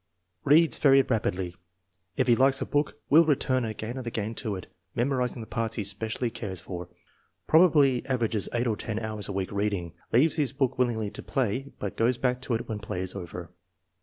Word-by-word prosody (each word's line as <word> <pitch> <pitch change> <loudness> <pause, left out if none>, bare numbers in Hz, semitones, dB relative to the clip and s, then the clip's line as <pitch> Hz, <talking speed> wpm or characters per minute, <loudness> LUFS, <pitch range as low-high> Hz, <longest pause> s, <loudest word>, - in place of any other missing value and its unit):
" 90 -1 -49
Reads 165 +2 +5
very 135 -2 +6
rapidly. 95 -7 -1 0.6
If 130 - +3
he 120 - +6
likes 135 +2 +4
a - - -2
book 145 +1 -1
will 160 +3 +8
return 130 -4 +1
again 110 +2 -5
and 130 -2 -6
again 110 -1 -3
to 110 -3 -2
it, 95 - -7 0.3
memorizing 125 -1 0
the - - -6
parts 115 0 -2
he 110 - -2
specially 110 +4 -2
cares 95 -6 -5
for. 90 -1 -7 0.6
Probably 150 -6 +5
averages 115 -6 0
eight 120 +1 0
or 115 -3 +1
ten 110 -2 -4
hours 110 -2 -2
a - - -2
week 95 -1 -3
reading. 100 -5 -2 0.2
Leaves 145 +8 +4
his 145 -4 +1
book 135 -2 -1
willingly 110 -4 0
to - - -7
play, 130 +1 -2
but 100 - -5
goes 120 +2 +2
back 125 0 0
to 125 -2 -1
it 115 - -4
when 110 -2 -4
play 100 -3 -4
is 95 0 -3
over. 90 -2 -7
115 Hz, 200 wpm, -27 LUFS, 100-130 Hz, 0.6 s, will